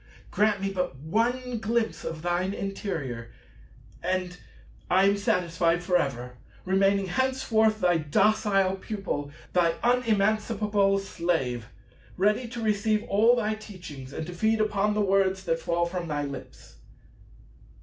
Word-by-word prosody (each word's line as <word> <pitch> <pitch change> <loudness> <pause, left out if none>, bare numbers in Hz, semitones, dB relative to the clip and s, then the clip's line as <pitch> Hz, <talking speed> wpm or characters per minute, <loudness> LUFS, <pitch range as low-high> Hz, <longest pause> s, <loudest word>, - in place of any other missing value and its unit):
Grant 210 -1 +2
me 195 0 -1
but 180 -6 -2
one 235 - -1
glimpse 225 +1 -1
of 160 -1 -5
thine 180 +3 0
interior, 160 - -4 0.7
and 180 0 -2 0.5
I 185 +2 +4
am 200 +1 +4
satisfied 175 -3 +1
for 180 0 0
ever, 125 -6 -1 0.3
remaining 195 +1 +2
henceforth 220 -1 +1
thy 175 -2 +3
docile 195 +4 +2
pupil, 190 -8 -4 0.2
thy 170 -2 +3
unemancipable 215 -3 +2
slave, 160 - -2 0.5
ready 210 +6 +2
to 235 0 -6
receive 215 0 +1
all 225 +5 +4
thy 215 -3 0
teachings 180 -11 -9
and 160 - -5
to 180 - -7
feed 220 +5 +1
upon 210 -1 +1
the 210 - +1
words 190 -1 +2
that 165 -2 0
fall 170 +1 0
from 175 0 -4
thy 145 -2 -2
lips. 140 - -9
195 Hz, 130 wpm, -27 LUFS, 170-215 Hz, 0.7 s, I